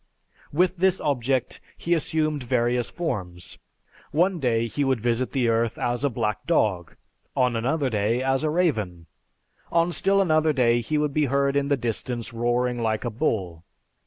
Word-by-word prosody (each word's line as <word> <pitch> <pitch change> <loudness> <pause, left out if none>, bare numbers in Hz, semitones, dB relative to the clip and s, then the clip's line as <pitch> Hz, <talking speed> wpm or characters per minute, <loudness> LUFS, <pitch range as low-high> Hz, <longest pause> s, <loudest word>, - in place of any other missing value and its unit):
With 180 +4 +2
this 190 +1 +2
object, 130 -2 -1 0.2
he 170 - 0
assumed 155 -2 0
various 120 0 0
forms. 90 - -5 0.5
One 175 +3 +1
day 115 -4 +1
he 140 +5 -2
would 135 -3 +1
visit 120 +2 0
the 130 -4 +1
earth 115 0 +1
as 120 +2 -1
a 140 - +3
black 105 -3 -3
dog, 100 - +1 0.4
on 125 -2 +2
another 135 +5 0
day 115 +2 0
as 135 +2 +1
a 155 - +1
raven, 110 - 0 0.7
on 170 +1 +2
still 195 +3 +2
another 155 -4 +3
day 120 -3 +3
he 150 +6 -1
would 150 -1 0
be 150 0 +2
heard 140 +1 +1
in 140 0 +1
the 140 -1 +2
distance 120 0 -4
roaring 120 +1 0
like 110 +1 -1
a 120 - -2
bull. 95 - -2
125 Hz, 165 wpm, -25 LUFS, 115-155 Hz, 0.7 s, a